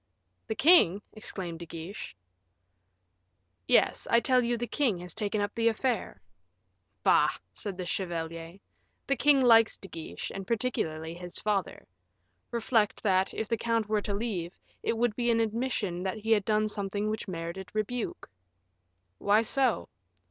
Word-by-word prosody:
"The 220 - -2
king!" 215 - +5
exclaimed 185 -6 -5
De 170 - -8
Guiche. 165 - -7 1.5
"Yes; - - +3
I 235 - +5
tell 255 0 +3
you 240 0 0
the 240 - -2
king 240 -4 +1
has 175 -1 -3
taken 210 0 -1
up 205 0 -2
the 230 -1 +1
affair." 235 +2 -1 0.8
"Bah!" - - +5 0.2
said 200 -3 -5
the 185 - -4
chevalier, 165 -1 -4 0.5
"the 275 - +1
king 280 -1 +4
likes 225 -2 +6
De 195 - -10
Guiche, 165 -3 -6
and 195 -1 -6
particularly 165 -9 -1
his 175 0 -6
father; 205 -3 -2 0.6
reflect, 225 -2 +1
that, 190 -2 +2
if 220 - -2
the 230 - 0
count 230 -1 0
were 210 -1 +1
to 200 -1 -2
leave, 195 -6 -3 0.2
it 230 - -1
would 235 -2 +1
be 240 0 0
an 230 -1 +3
admission 220 -5 -1
that 190 +3 -2
he 220 +1 -3
had 210 -3 +4
done 215 0 +2
something 205 0 -2
which 215 0 -4
merited 175 +1 -5
rebuke." 220 +3 -3 0.9
"Why 210 +2 +4
so?" 265 +3 +1
210 Hz, 155 wpm, -29 LUFS, 185-230 Hz, 1.5 s, likes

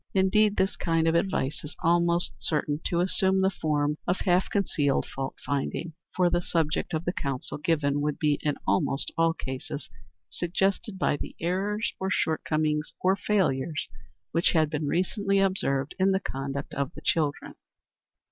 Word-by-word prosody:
Indeed, 200 +2 +4
this 190 +1 +1
kind 165 -1 +1
of 165 - +3
advice 170 -5 0
is 150 - -8
almost 170 +1 +3
certain 150 -1 0
to 170 0 +1
assume 190 +1 +2
the 190 0 +3
form 150 -3 0
of 180 - 0
half 180 0 +2
concealed 150 -8 +1
fault 135 0 -5
finding, 145 +4 -2 0.2
for 180 -1 +4
the 175 0 +1
subject 165 -2 0
of 160 +2 -3
the 175 - 0
counsel 140 -1 -3
given 145 -2 +1
would 150 0 -1
be, 150 -2 +1
in 150 -2 0
almost 100 +8 +1
all 165 0 +3
cases, 130 -4 -6 0.4
suggested 190 +3 -1
by 150 - +1
the - - -7
errors, 195 +5 -1
or 190 - -1
shortcomings, 155 -3 0
or 190 +1 +3
failures 165 -8 0 0.4
which 165 +3 +2
had 155 -3 +3
been 150 -1 -2
recently 195 +5 +1
observed 170 -8 +1
in 190 +1 +4
the 190 0 +2
conduct 140 -4 -5
of 140 -1 -2
the - - -9
children. 150 -3 0
165 Hz, 160 wpm, -27 LUFS, 145-190 Hz, 0.4 s, Indeed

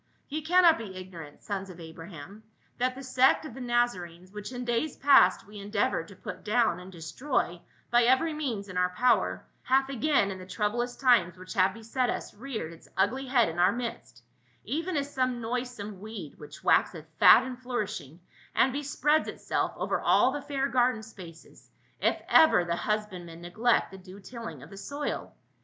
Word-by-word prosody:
Ye 310 +2 -3
cannot 340 -1 +5
be 200 -4 -7
ignorant, 170 -5 -10
sons 195 -2 -4
of 180 -1 -11
Abraham, 165 +3 -10 0.4
that 255 +1 +1
the 270 - -8
sect 260 +3 +3
of 270 - -8
the 265 - -9
Naza 240 -4 +1
renes, 175 +2 -12
which 210 +2 -7
in 245 -1 -5
days 240 +5 -1
past 270 -10 +5
we 205 +1 -11
endeavored 200 -4 -1
to 200 - -13
put - - -8
down 225 -2 +2
and 180 +1 -11
destroy 175 - -2 0.3
by 240 0 +5
every 260 +6 +3
means 245 -10 -3
in 185 -1 -7
our 180 0 +2
power, 245 +7 +1 0.2
hath 265 +1 +2
agam 275 -6 +1
in 190 - -7
the 185 - -9
troublous 235 +5 -1
times 230 -10 +3
which 185 0 -9
have 190 +1 +2
beset 230 +3 -1
us - - -4
reared 220 -8 -6
its 165 - -17
ugly 260 +7 +1
head 250 -3 +3
in 165 +1 -5
our 180 +2 +5
midst, 200 - -6 0.4
even 325 - -2
as 285 0 -3
some 255 -2 0
noisome 230 -4 -4
weed 210 -7 -8
which 150 0 -12
waxeth 160 -4 +2
fat 240 - +8
and 255 -1 -6
flourishing 215 - -4 0.4
and 260 +1 +3
bespreads 295 +2 +1
itself - - -2
over - - -1
all 260 - +4
the 290 +1 -4
fair 275 -1 -1
garden 245 -4 +1
spaces, 180 -7 -13 0.3
if - - +1
ever 315 - +6
the 170 0 -1
husbandman 185 -5 -3
neglect 215 +8 +1
the 190 - -10
due 185 +1 -12
tilling 230 +3 -8
of - - -14
the 195 - -10
soil. 285 +8 -5
225 Hz, 185 wpm, -28 LUFS, 185-255 Hz, 0.4 s, fat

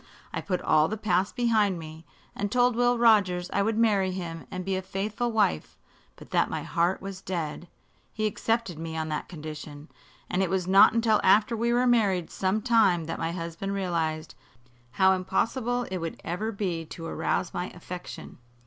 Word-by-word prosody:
I - - -2
put 180 -2 -2
all 155 0 +4
the 220 - -3
past 190 -2 0
behind 220 -6 +2
me, 160 0 -10 0.3
and 205 0 -3
told 245 0 +3
Will 245 0 +3
Rogers 200 -6 +3
I 200 - +2
would 220 +2 0
marry 205 -4 +3
him 170 -3 -6
and 185 -2 -5
be 195 0 0
a 185 - -2
faithful 205 +5 -3
wife; 150 - 0 0.4
but - - -15
that - - +2
my - - -3
heart 175 +3 0
was 195 -1 -7
dead. 170 -2 -4 0.4
He 215 - -2
accepted 215 -4 -1
me 160 0 -5
on 160 0 -2
that 150 - -4
condition, 150 -2 -8 0.4
and 185 - 0
it 190 - +1
was 185 -1 0
not 195 +3 +7
until 225 -2 +3
after 210 +4 +4
we 235 +1 0
were 245 +1 +3
married 205 -8 +2
some 195 +3 -1
time 215 -9 +3
that 165 - -5
my 165 0 -1
husband 170 +3 -4
realized 165 -4 -2 0.6
how 190 +4 +5
impossible 230 +6 0
it 185 - -2
would 165 -1 -5
ever 210 +6 -2
be 185 -6 -2
to 165 +1 -9
arouse 165 +1 -1
my 180 +1 -3
affection. 180 -4 -9
190 Hz, 185 wpm, -27 LUFS, 170-220 Hz, 0.6 s, not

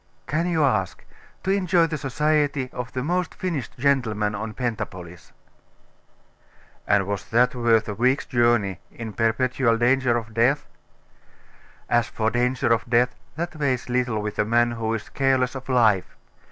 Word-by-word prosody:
'Can 165 +4 -1
you 165 -3 +1
ask? 105 -10 0 0.4
To 190 - 0
enjoy 180 -3 +3
the 160 -1 -3
society 145 -1 0
of 125 0 -5
the 125 - -2
most 175 +1 -1
finished 165 -9 -4
gentleman 115 -6 +1
of 110 +1 -5
Pentapolis.' 95 -8 -5 1.6
'And 100 -1 +3
was 100 -1 -4
that 125 +2 +3
worth 115 -3 +2
a 105 - -3
week's 125 +6 +1
journey 120 -7 +1
in 115 -2 -8
perpetual 115 +1 +1
danger 120 0 +2
of 110 -1 -6
death?' 125 +6 +2 1.2
'As 120 0 +2
for 110 0 -1
danger 125 0 +1
of 115 +1 -2
death, 120 +1 +3 0.2
that 170 +1 -4
weighs 130 -4 -1
little 125 -4 0
with 105 -1 -5
a - - +4
man 120 +2 +2
who 115 -1 -3
is 110 - -6
careless 130 -2 +1
of 130 0 -8
life. 110 -7 +2
120 Hz, 155 wpm, -24 LUFS, 110-135 Hz, 1.6 s, a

